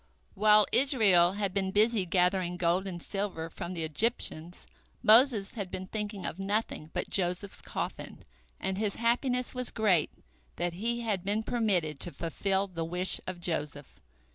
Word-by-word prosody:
While 210 0 +5
Israel 205 -10 +4
had 200 -2 -2
been 195 -1 0
busy 210 -1 +2
gathering 180 0 +1
gold 180 +2 +1
and 175 -3 -6
silver 190 -5 -4
from 180 +1 -6
the 165 - -2
Egyptians, 170 -1 0 0.4
Moses 225 -2 +5
had 200 -5 -5
been 185 - -5
thinking 205 -1 -5
of 175 - -4
nothing 195 -5 -2
but - - -4
Joseph's 185 +1 -1
coffin, - - -6 0.3
and 190 +1 -2
his 210 -2 -1
happiness 245 +2 0
was 250 -1 -2
great 195 -8 +2 0.5
that 175 -1 -2
he 235 +6 -2
had 210 -6 -2
been 205 +3 -1
permitted 185 - 0
to 175 - -2
fulfil 190 +5 -1
the 170 -4 -5
wish 180 +3 +1
of 185 -1 -5
Joseph. 150 -5 -4
195 Hz, 155 wpm, -29 LUFS, 175-215 Hz, 0.5 s, While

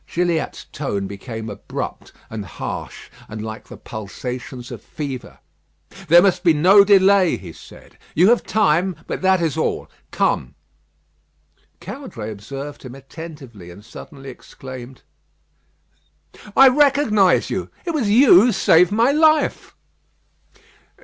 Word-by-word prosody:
Gilliatt's 170 -2 -2
tone 105 -9 -3
became 110 +3 -7
abrupt 105 - -7 0.2
and 110 -2 -5
harsh, 100 - -8 0.2
and 110 - -7
like 110 0 -8
the - - -11
pulsations 125 +4 -8
of 120 - -8
fever. 140 -4 -7 0.7
"There 170 +3 +7
must 185 -2 +1
be 165 -4 +4
no 190 +7 +6
delay," 195 -2 +4
he 85 -4 -11
said. - - -16 0.2
"You 180 +5 +5
have 240 - +3
time, 185 -3 +1
but - - -5
that 190 0 +3
is 160 -4 -1
all. - - -2 0.2
Come." 65 +2 -1 1.2
Caudray 180 - -8
observed 135 +8 -8
him 130 -1 -10
attentively; 135 - -11
and 100 +4 -14
suddenly 135 +2 -11
exclaimed: 130 0 -12 1.5
"I 270 - +9
recognise 260 -8 +3
you. - - -3 0.2
It 340 - -2
was 275 -10 -1
you 240 +5 +6
who 245 +3 +3
saved 180 -1 +4
my 230 +5 +3
life." 310 +1 +1
160 Hz, 125 wpm, -20 LUFS, 120-200 Hz, 1.5 s, I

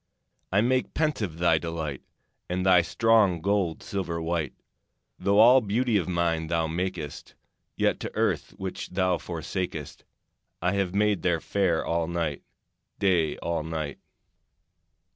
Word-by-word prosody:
I 100 +2 +4
make 130 +2 0
pensive 115 - -1
thy 85 -2 +3
delight, 80 -4 -4 0.5
And 90 +1 -1
thy 90 -2 +6
strong 105 -1 +3
gold 95 -2 0
silver 90 -4 -3
white. 80 -3 -2 0.6
Though 100 0 +2
all 125 +4 +8
beauty 115 +2 0
of 90 -3 -1
nine 85 -2 0
thou 85 0 +1
makest, 80 -2 -4 0.4
Yet - - +1
to - - -6
earth - - 0
which 95 -1 -5
thou 90 -1 +1
forsakest 85 -2 -5 0.6
I 90 - +1
have 95 -2 -1
made 105 -3 +2
thee 85 -1 +2
fair 90 -2 0
all 85 -1 0
night, 85 -4 -2 0.6
Day 85 -6 +2
all 85 -1 -1
night. 80 -2 -4
90 Hz, 135 wpm, -27 LUFS, 80-100 Hz, 0.6 s, all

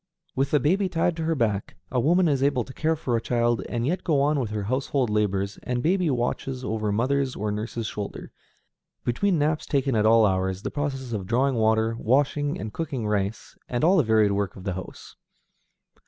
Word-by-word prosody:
With 135 +1 +1
the 150 - +3
baby 185 +8 +1
tied 170 0 +1
to 160 - -2
her 165 0 +1
back, 105 -6 -1 0.2
a 125 - +1
woman 170 +8 +3
is 140 -4 +1
able 135 -3 +2
to 130 - -11
care 160 +3 0
for 130 -6 -2
a 115 - 0
child, 120 0 +1
and 120 -1 -1
yet 175 +6 -1
go 155 -5 +2
on 145 +1 +2
with 120 -5 -2
her 105 -1 -3
household 130 +1 0
labors, 100 -2 0
and 125 -1 -2
baby 180 0 +2
watches 125 0 -2
over 110 -3 -1
mother's 130 +5 0
or 105 0 -2
nurse's 110 +2 -4
shoulder, 105 -1 -6 0.7
between 175 +10 +1
naps 150 +1 0
taken 135 -3 +1
at 110 0 +3
all 115 0 +6
hours, 95 0 0
the - - -3
processes 135 -4 -3
of 100 -4 -3
drawing 130 +5 +2
water, 110 0 +2
washing 145 +4 +1
and 105 +2 -6
cooking 140 -8 -3
rice, 105 0 -2
and 120 +2 -1
all 185 +4 +5
the - - +6
varied 110 -2 +3
work 100 -2 -1
of 95 - -10
the 95 - -2
house. 95 0 -9
125 Hz, 205 wpm, -25 LUFS, 110-145 Hz, 0.7 s, all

